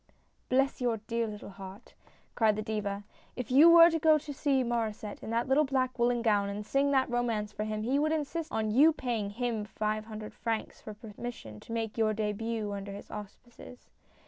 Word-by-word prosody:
" - - -42
Bless 270 +1 +1
your 240 -2 +1
dear 230 +2 -2
little 210 -1 -8
heart 195 +3 -11
I - - -27
" - - -37
cried 220 -3 +3
the 215 - -3
Diva, 205 -2 -3 0.2
" - - -31
if 250 -1 -5
you 295 +6 +8
were 335 0 +9
to 325 - 0
go 315 0 +5
to 300 -1 -7
see 275 -1 +1
Mauresset 225 -3 -3
in - - -7
that 230 +2 0
little 270 +3 +4
black 260 -2 -1
woolen 240 0 +2
gown, 205 -3 +2
and 205 +1 -5
sing 275 +5 +1
that 270 -2 +3
romance 230 -4 -1
for 210 - -3
him, 215 0 -3
he 265 +5 +1
would 310 +1 +1
insist 320 +1 -2
on 215 -1 -1
you 295 +8 +6
paying 235 -8 -2
him 230 0 -2
five 215 0 -3
hundred 215 -1 -8
francs 225 -2 -4
for 215 - -9
per 215 -1 -11
mission 115 - -7
to - - -13
make 225 -1 -3
your 215 -1 +2
dehut 215 0 -2
under 200 0 -6
his 200 - -10
auspices. 235 +4 -11
230 Hz, 220 wpm, -30 LUFS, 210-260 Hz, 0.2 s, were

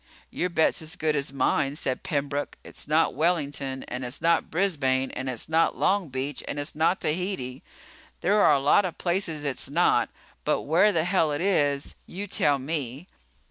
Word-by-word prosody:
"Your 180 - -1
bet's 165 0 +2
as 160 0 -6
good 155 -1 0
as 140 -2 -2
mine," 135 +1 +1
said 130 -3 -2
Pembroke. 145 -3 -2
"It's - - -10
not 155 +2 +3
Wellington, 145 -4 -1
and 125 +1 -5
it's 125 +2 -4
not 170 0 +2
Brisbane, 140 -8 +1
and 130 0 -4
it's 125 -3 -4
not 160 +1 +2
Long 195 -4 +1
Beach, 130 +2 -4
and - - -4
it's 145 0 -3
not 165 +4 +1
Tahiti. 155 -6 -3 0.6
There 205 +3 +3
are 150 - +6
a 140 - +3
lot 145 +8 +4
of 180 -3 -4
places 170 -4 -1
it's 140 -3 -2
not. - - +3 0.3
But - - 0
where 175 +8 +4
the 165 -5 +1
hell 175 -3 +2
it 145 - -2
is, 145 -7 +1
you 195 +3 -5
tell 145 -7 +2
me. 140 +1 -4
150 Hz, 180 wpm, -26 LUFS, 140-175 Hz, 0.6 s, are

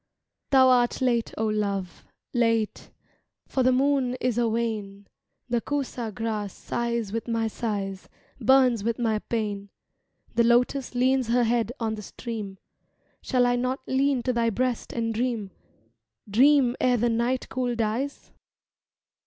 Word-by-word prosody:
Thou 265 -2 +6
art 245 -1 +3
late, 240 -3 +1
O 220 - 0
Love, 200 -4 -2 0.3
Late, 230 -3 0 0.6
For 265 - 0
the 255 0 +4
moon 265 -1 +2
is 245 -2 0
a 235 -1 +2
wane. 215 -3 -3 0.4
The 240 -1 0
kusa 255 -5 -3
grass 210 -1 -3
sighs 235 -3 -3
with 230 +1 -3
my 230 -1 0
sighs, 200 -4 -4 0.3
Burns 255 -5 +4
with 230 +1 -1
my 225 -3 0
pain. 205 -3 -3 0.6
The 235 0 +3
lotus 245 +3 +2
leans 255 0 +2
her 240 +1 +3
head 235 0 +1
on 225 -2 -1
the 215 - -6
stream 210 -2 -6 0.6
Shall 250 -2 +2
I 245 0 +2
not 255 +2 -1
lean 265 -1 +1
to 255 - 0
thy 235 -1 +2
breast 250 +2 -2
and 230 -1 -2
dream, 225 -4 -2 0.8
Dream 255 +3 +4
ere 250 -1 +3
the 240 +1 +1
night 235 +3 0
cool 250 -2 -1
dies? 230 +5 -2
235 Hz, 145 wpm, -26 LUFS, 220-255 Hz, 0.8 s, Thou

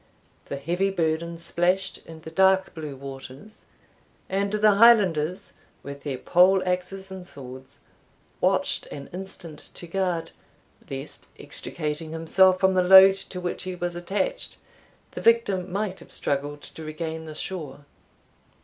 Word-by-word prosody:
The 140 - -5
heavy 175 +7 0
burden 170 -2 -1
splashed 175 +3 0
in 160 -1 -11
the 160 - -9
dark 190 +2 +3
blue 155 -4 -6
waters, 135 +8 -10 0.6
and 200 +1 0
the 215 0 +4
Highlanders, 195 -6 +4 0.3
with 140 0 -8
their 140 -3 -4
pole 185 +7 +4
axes 185 +1 -3
and 185 -1 -8
swords, 130 -4 -11 0.6
watched - - +1
an 140 -1 -9
instant 180 -4 -7 0.2
to - - -9
guard, 170 -2 -2 0.6
lest, 135 +2 -7
extricating 155 0 -5
himself 185 +3 +4
from 190 0 +3
the 185 - +3
load 190 +1 +9
to 195 -1 -7
which 175 -1 -3
he 185 -1 -4
was 175 -1 -3
attached, 205 - -3 0.5
the - - -7
victim 200 -6 +2
might 195 -1 -2
have - - -13
struggled 145 +1 -2
to 160 - -10
regain 160 +1 -5
the 155 -1 -8
shore. 150 -5 -5
175 Hz, 140 wpm, -25 LUFS, 155-190 Hz, 0.6 s, load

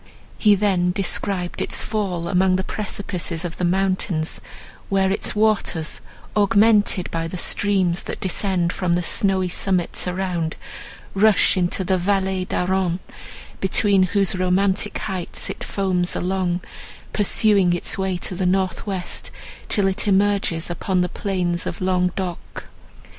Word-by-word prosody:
He 210 -2 +5
then 190 -3 +1
described 190 -1 -1
its - - -1
fall 190 -6 -2
among 185 0 +3
the 190 - -1
precipices 185 -5 -4
of 170 - -6
the - - -3
mountains, 185 -3 0 0.5
where 195 -1 +2
its 200 - 0
waters, 210 -7 0 0.3
augmented 205 -2 +3
by 165 0 -2
the 180 - -6
streams 185 -2 +1
that - - -6
descend 185 -2 0
from 180 -2 0
the 175 +1 +1
snowy 190 +1 +2
summits 180 0 0
around, 180 -3 -2 0.6
rush 210 +1 +4
into 185 +1 0
the 185 0 +1
Vallée 190 0 0
d'Aran, 185 -1 0 0.6
between 195 0 +3
whose 195 0 +2
romantic 185 +2 +1
heights 185 -4 -3
it - - -7
foams 185 -3 -1
along, 180 -1 -1 0.5
pursuing 205 -2 +3
its 175 - -1
way 190 -2 -1
to 180 - -4
the 180 0 -1
north 190 +2 0
west 190 -3 -4 0.4
till 205 -3 +2
it 195 +2 -1
emerges 195 -4 +1
upon 185 +1 0
the 180 - 0
plains 180 -3 -2
of - - -4
Languedoc. 180 -1 -2
185 Hz, 135 wpm, -22 LUFS, 180-195 Hz, 0.6 s, He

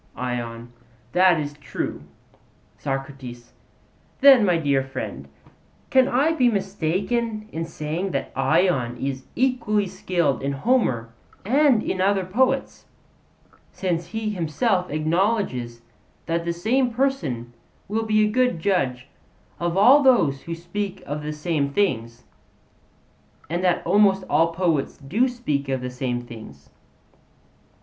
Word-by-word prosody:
ION: 120 -1 -4 0.4
That 180 -2 +4
is 145 -1 -4
true. 145 -1 -5 0.8
SOCRATES: 135 -3 -6 0.7
Then, 270 -4 +8
my 180 -4 +3
dear 140 -4 +1
friend, 130 - -6 0.6
can 260 -1 +5
I 275 +5 +2
be 255 -7 +3
mistaken 205 +3 -1
in 165 +1 -3
saying 165 +3 -4
that - - -3
Ion 155 -8 +1
is 130 0 -4
equally 240 -5 +1
skilled 170 -6 -1
in 140 +1 -1
Homer 135 - 0 0.3
and 265 0 +4
in 185 - -2
other 195 -1 +2
poets, 260 +8 0 0.8
since 175 -3 -2
he 220 -1 -3
himself 180 +2 0
acknowledges 155 - -1 0.4
that 170 0 -1
the 170 - 0
same 240 +9 +1
person 225 - -1 0.3
will 220 +3 -1
be 215 0 +4
a 210 - -1
good 250 -6 +1
judge 135 -9 0 0.5
of 175 +1 -1
all 255 +9 +7
those 185 - +3
who 165 - -5
speak 185 +3 -5
of 150 +1 -4
the 150 0 -4
same 150 -2 -1
things; 125 - -1 1.3
and 175 +2 -1
that 180 -2 +1
almost 195 -2 +4
all 165 +1 +3
poets 165 -5 0
do 195 - +1
speak 150 - -3
of 130 -1 -1
the 125 0 -4
same 125 -1 -2
things? 70 - -12
170 Hz, 125 wpm, -23 LUFS, 135-215 Hz, 1.3 s, Then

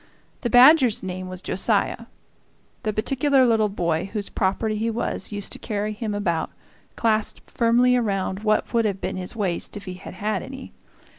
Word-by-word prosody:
The 240 - -1
badger's 255 -2 +6
name 185 0 -5
was 185 0 -7
Josiah; 215 +3 0 0.7
the 215 - -1
particular 265 +5 +2
little 220 -3 +3
boy 175 -1 -1
whose 210 -2 -3
property 210 +3 0
he 225 +2 -1
was 230 0 -3
used 205 -1 -5
to - - -5
carry 210 0 -3
him 210 -1 -4
about, 170 -5 -1 0.5
clasped 220 -2 0
firmly 245 +2 +3
around 195 -5 -1
what 215 +2 0
would 230 -1 +3
have 200 -2 -1
been - - -3
his 185 +4 -6
waist 200 -1 -2
if 200 - -9
he 185 - -5
had 185 0 -10
had 210 +3 -1
any. 265 0 -9
215 Hz, 170 wpm, -23 LUFS, 190-230 Hz, 0.7 s, badger's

